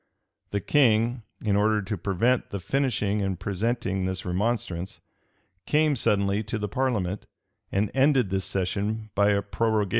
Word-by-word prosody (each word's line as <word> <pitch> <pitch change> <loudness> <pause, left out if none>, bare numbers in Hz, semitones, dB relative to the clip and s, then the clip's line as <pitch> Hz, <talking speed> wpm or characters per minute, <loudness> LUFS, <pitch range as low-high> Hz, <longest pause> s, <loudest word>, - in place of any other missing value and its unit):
[*] - - -52
The 100 - -2
king, 120 -3 +3 0.2
in 105 -2 +1
order 105 +1 +3
to 105 +1 -3
prevent 100 +7 +1
the 100 - -4
finishing 105 -3 0
and 95 -2 -2
presenting 100 0 -1
this 95 0 -3
remonstrance, 95 -1 -2 0.7
came 150 -1 +3
suddenly 100 -3 +1
to 110 +1 -3
the 105 -1 -2
parliament, 105 -6 -1 0.4
and 100 +1 0
ended 135 -6 +3
this 95 -1 -1
session 105 +3 -2
by 100 +1 +3
a 100 -1 +2
prorogation. 110 0 0
105 Hz, 150 wpm, -26 LUFS, 95-115 Hz, 0.7 s, king